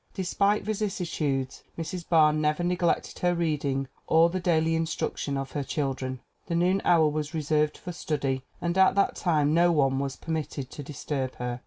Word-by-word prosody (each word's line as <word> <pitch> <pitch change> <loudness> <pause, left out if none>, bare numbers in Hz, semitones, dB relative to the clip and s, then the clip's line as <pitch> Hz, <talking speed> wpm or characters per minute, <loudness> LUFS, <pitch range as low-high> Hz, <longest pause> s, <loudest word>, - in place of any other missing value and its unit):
Despite 200 +2 +1
vicissitudes 170 -10 -2 0.2
Mrs. 170 +1 -5
Barr 155 -3 +5
never 155 +2 0
neglected 175 -1 0
her 175 0 +2
reading 145 -5 -1 0.2
or 165 +1 +5
the 185 - -1
daily 165 -2 +2
instruction 160 -3 -2
of 135 -1 -4
her 145 - -2
children. 130 -2 -3 0.3
The 170 - -1
noon 180 +3 +2
hour 165 -3 +5
was 150 +1 -3
reserved 150 0 +1
for 180 - -7
study 140 -5 -2 0.2
and 170 0 -1
at 190 0 +5
that 200 - +2
time 155 -4 +2
no 175 +1 +5
one 135 -4 +2
was 140 -1 -2
permitted 155 -5 -4
to - - -7
disturb 140 -2 -4
her. 125 0 -4
155 Hz, 170 wpm, -27 LUFS, 140-175 Hz, 0.3 s, Barr